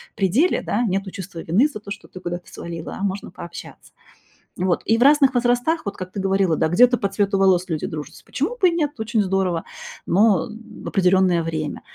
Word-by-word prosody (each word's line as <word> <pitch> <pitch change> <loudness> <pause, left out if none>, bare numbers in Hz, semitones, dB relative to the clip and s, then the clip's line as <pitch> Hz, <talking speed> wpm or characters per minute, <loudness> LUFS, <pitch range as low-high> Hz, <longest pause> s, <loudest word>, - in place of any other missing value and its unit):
при 195 -3 +1
деле, 285 - +2
да, 235 +4 0
нету 195 -2 -1
чувства 185 -3 -8
вины 195 - +2
за 245 -8 -8
то, 200 -1 -11
что 210 - -7
ты 185 - -10
куда-то 175 -1 -6
свалила, 165 -1 -7
а - - -4
можно 195 0 -3
пообщаться. 175 - -10 0.6
И 180 - -2
вот, 175 - +1
и 225 - +3
в 245 - +3
разных 280 -2 +5
возрастах, 245 +5 +1
вот 200 - -4
как 185 0 -7
ты 200 - -5
говорила, 190 -4 +1
да, - - +2
где-то 245 +8 +5
по 200 - 0
цвету 195 0 0
волос 185 -1 +3
люди 155 -2 -2
дружатся. 150 -2 -8
Почему - - -3
бы 370 - +5
и - - -1
нет? 295 -7 -2
Очень 220 0 0
здорово, 185 -3 0 0.4
но 210 +4 +3
в 220 0 -12
определенное 185 -2 +3
время. 155 -2 -4
195 Hz, 210 wpm, -22 LUFS, 180-230 Hz, 0.6 s, разных